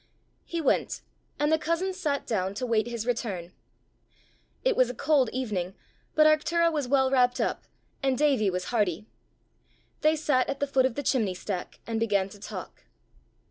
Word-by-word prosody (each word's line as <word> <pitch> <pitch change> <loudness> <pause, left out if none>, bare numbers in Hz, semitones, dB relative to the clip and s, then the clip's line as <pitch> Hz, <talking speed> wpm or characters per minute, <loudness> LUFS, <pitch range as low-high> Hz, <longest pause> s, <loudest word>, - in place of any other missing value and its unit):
He 340 - -3
went, 285 - +1 0.4
and 295 +1 +2
the 315 - +4
cousins 335 +4 -1
sat 300 -7 -1
down 195 -3 -1
to 250 - -2
wait 230 -2 +1
his 235 -2 -4
return. 200 -8 -3 1.1
It - - +2
was 255 -1 +4
a 250 - -5
cold 275 -2 +3
evening, 200 -8 -3 0.4
but 310 - +6
Arctura 335 +2 +3
was 295 -4 -1
well 265 0 +3
wrapt 250 -2 +3
up, - - -1 0.4
and 270 -1 +1
Davie 275 -9 +3
was 180 0 -2
hardy. 205 -3 +1 1.0
They 310 +1 +4
sat 290 -4 +1
at 275 - -2
the 285 - +1
foot 270 -2 +3
of 245 - -7
the 285 - -3
chimney 220 -9 +1
stack, 180 0 -5
and 225 -1 -2
began 200 -4 +1
to 205 - -13
talk. - - -8
255 Hz, 175 wpm, -27 LUFS, 210-295 Hz, 1.1 s, but